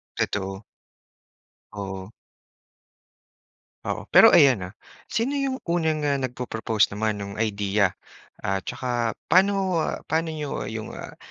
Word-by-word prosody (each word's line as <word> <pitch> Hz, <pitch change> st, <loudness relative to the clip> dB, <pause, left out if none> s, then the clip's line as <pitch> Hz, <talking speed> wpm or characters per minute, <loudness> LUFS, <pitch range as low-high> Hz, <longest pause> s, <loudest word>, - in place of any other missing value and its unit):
Totoo. 95 Hz, 0 st, -2 dB, 1.1 s
Oo. 95 Hz, -1 st, -6 dB, 1.7 s
Oo, -, -, -3 dB
pero -, -, +10 dB
ayan, 130 Hz, -8 st, +6 dB
ah, -, -, -17 dB, 0.4 s
sino 240 Hz, +5 st, 0 dB
yung 275 Hz, -2 st, -1 dB
unang, 160 Hz, -3 st, 0 dB
ah, 145 Hz, -, +2 dB
nagpro-propose 115 Hz, -4 st, 0 dB
naman 110 Hz, 0 st, -1 dB
no'ng 100 Hz, 0 st, -6 dB
idea? 100 Hz, -2 st, +1 dB, 0.5 s
At 95 Hz, 0 st, -2 dB
tsaka, 120 Hz, -3 st, -2 dB
paano 190 Hz, -2 st, +3 dB, 0.2 s
paano 160 Hz, +1 st, 0 dB
niyo 150 Hz, -3 st, -4 dB
yung 110 Hz, -1 st, -6 dB
ah, -, -, -9 dB
115 Hz, 110 wpm, -25 LUFS, 100-160 Hz, 1.7 s, pero